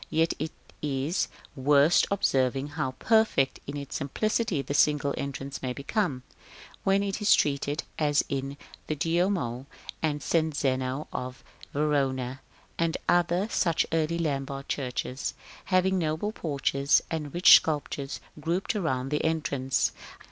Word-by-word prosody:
Yet 165 +1 +2
it 155 +1 -3 0.3
is 145 +3 0 0.3
worth 145 +4 +4
observing 135 -7 +1
how 145 -3 -3
perfect 220 -12 +2
in 140 +1 -4
its 140 -1 -6
simplicity 190 - 0
the 140 - -4
single 145 -1 +3
entrance 140 0 -5
may 130 -1 -2
become, 140 - -1 0.6
when 195 0 +3
it 200 +1 -3
is 210 - +6
treated 145 +2 0 0.2
as 145 -2 +3
in 135 +1 -3 0.3
the 155 - -1
Duomo 165 -6 0 0.3
and 150 -2 -1
St. 160 -2 +1
Zeno 130 +1 -1
of 125 0 -5 0.3
Verona, 135 -3 0 0.4
and 165 0 +1
other 175 +3 +2
such 170 -4 +2
early 165 +1 +1
Lombard 140 -4 -2
churches, 130 0 -3 0.3
having 190 0 +2
noble 160 +5 -1
porches, 140 -5 +1
and 150 -3 -3
rich 175 +4 +9
sculptures 145 -2 -3 0.2
grouped 170 +8 -1
around 135 -9 -1
the 150 +1 0
entrance. 140 -5 0
145 Hz, 130 wpm, -28 LUFS, 135-170 Hz, 0.6 s, rich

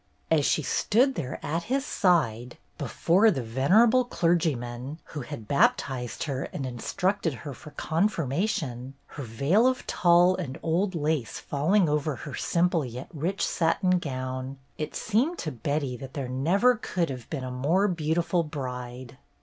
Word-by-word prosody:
As 150 -3 +4
she 155 - +1
stood 250 - +2
there 140 - -4
at 165 +3 -2
his 270 +1 +1
side, 125 - +1 0.2
before 195 +7 +3
the 135 - -1
venerable 200 - +4
clergyman 150 - -1
who 150 - -7
had 120 -4 -8
baptized 140 - +1
her 140 -4 -3
and 135 - -5
instructed 165 - -1
her 145 - -5
for 150 - -12
confirma 165 +2 0
tion, 130 - -4
her - - -9
veil 140 - +2
of 255 -1 0
tulle 175 +1 +4
and 155 -5 -5
old 180 +4 0
lace 150 -6 -1
falling 170 +7 +1
over 150 -1 0
her 130 +3 -8
simple 170 +1 +1
yet 125 +1 -7
rich 170 +6 -1
satin 180 +2 +2
gown, 130 -2 -4 0.2
it 150 - -5
seemed 250 - +1
to 155 - -3
Betty 140 +1 -2
that 135 +2 -10
there 135 -3 -3
never 180 - +3
could 175 - -2
have 125 -3 -8
been 140 -4 -4
a 130 - -4
more 160 +11 +2
beautiful 170 0 0
bride. 125 -4 -6
155 Hz, 155 wpm, -27 LUFS, 130-180 Hz, 0.2 s, As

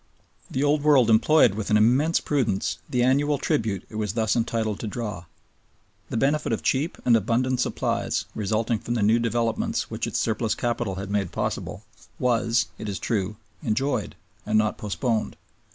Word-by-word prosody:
The 135 - -1
Old 145 +1 +2
World 140 -6 +5
employed 115 +2 +5
with 105 0 -4
an 105 - +5
immense 130 +10 +3
prudence 125 -10 -1
the 125 -1 +1
annual 140 +3 +2
tribute 105 -7 -1
it 110 - -8
was 105 -3 -2
thus 110 -2 +1
entitled 115 -3 -1
to 110 - -4
draw. 105 -6 -5 0.8
The - - -2
benefit 145 +5 +1
of - - -2
cheap 145 +5 0
and 120 - +5
abundant 120 +4 +1
supplies - - -1
resulting 110 +2 -1
from 120 - -3
the 110 - +1
new 110 +3 +4
developments 115 -1 -1
which - - -2
its - - -2
surplus 110 0 0
capital 120 -5 -2
had 100 +1 -6
made 100 -4 -1
possible, - - -3 0.3
was, 120 -1 +2
it 110 - -5
is 100 - -3
true, 105 -3 -2 0.3
enjoyed 125 -1 -1 0.3
and 110 0 +1
not 110 0 +2
postponed. 110 +2 -2
115 Hz, 170 wpm, -25 LUFS, 105-125 Hz, 0.8 s, World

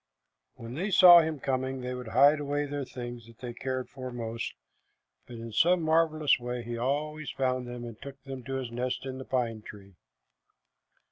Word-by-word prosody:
When 115 +1 -9
they 180 +9 -2
saw 180 -2 +9
him 160 -2 -1
coming, 130 0 -2
they 125 0 -4
would 125 -1 -6
hide 140 +6 +5
away 145 0 -1
the 145 -1 -4
things 120 -2 -7
that 115 -1 -16
they 125 -2 -7
cared 130 0 -3
for 130 -1 -7
most, 115 -1 -4 0.7
but 120 - -9
in 115 0 -7
some 175 +9 +3
marvelous 155 -2 +3
way 125 0 -4
he 120 0 -5
always 150 +5 -2
found 130 -1 -1
them 120 0 -6
and 115 -2 -10
took 140 0 -9
them 135 -2 -7
to 135 - -4
his 130 -3 -4
nest 125 +2 -3
in 130 0 -5
the 130 - -7
pine 115 -4 -1
tree. 100 -2 -12
130 Hz, 190 wpm, -29 LUFS, 120-145 Hz, 0.7 s, saw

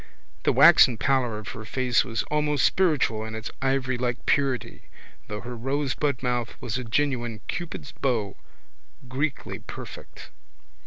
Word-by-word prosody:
The - - +5
waxen 120 - +7
pallor 130 -4 +1
of 105 - -7
her 110 - -7
face 125 +3 +1
was 115 -1 -2
almost 150 -2 +2
spiritual 150 -12 +2
in 110 0 -6
its 110 +1 -5
ivorylike 130 -2 0
purity 135 -2 0 0.4
though 105 0 -5
her 125 0 -6
rosebud 135 +1 -1
mouth 120 -2 -1
was 120 +2 -3
a - - -4
genuine 120 -3 -1
Cupid's 160 -4 -5
bow, 115 -7 -1 0.7
Greekly 135 +3 -2
perfect. - - -9
125 Hz, 130 wpm, -26 LUFS, 115-140 Hz, 0.7 s, waxen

